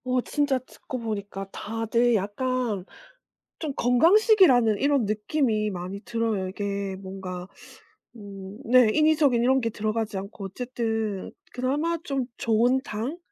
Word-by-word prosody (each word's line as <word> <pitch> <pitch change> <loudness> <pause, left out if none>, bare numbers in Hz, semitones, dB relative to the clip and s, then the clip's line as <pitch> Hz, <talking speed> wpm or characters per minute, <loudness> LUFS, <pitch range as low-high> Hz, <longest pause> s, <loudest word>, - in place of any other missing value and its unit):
어 255 0 +1
진짜 285 0 0
듣고 255 0 -8
보니까 200 -3 -5
다들 225 +2 0
약간 215 0 -1 0.7
좀 305 -4 -3
건강식이라는 260 - +5
이런 280 -4 +2
느낌이 215 +1 0
많이 185 +2 -6
들어요. 225 -5 -1
이게 200 0 -3
뭔가 190 -2 -7 0.7
음 200 -1 -9
네 250 -1 +6
인위적인 305 -5 +4
이런 265 +2 +3
게 230 - 0
들어가지 215 0 -2
않고 200 +1 -7
어쨌든 225 -2 -3 0.2
그나마 290 +7 0
좀 275 -5 -2
좋은 235 +3 +2
당 230 +10 -4
230 Hz, 260 characters per minute, -26 LUFS, 200-255 Hz, 0.7 s, 네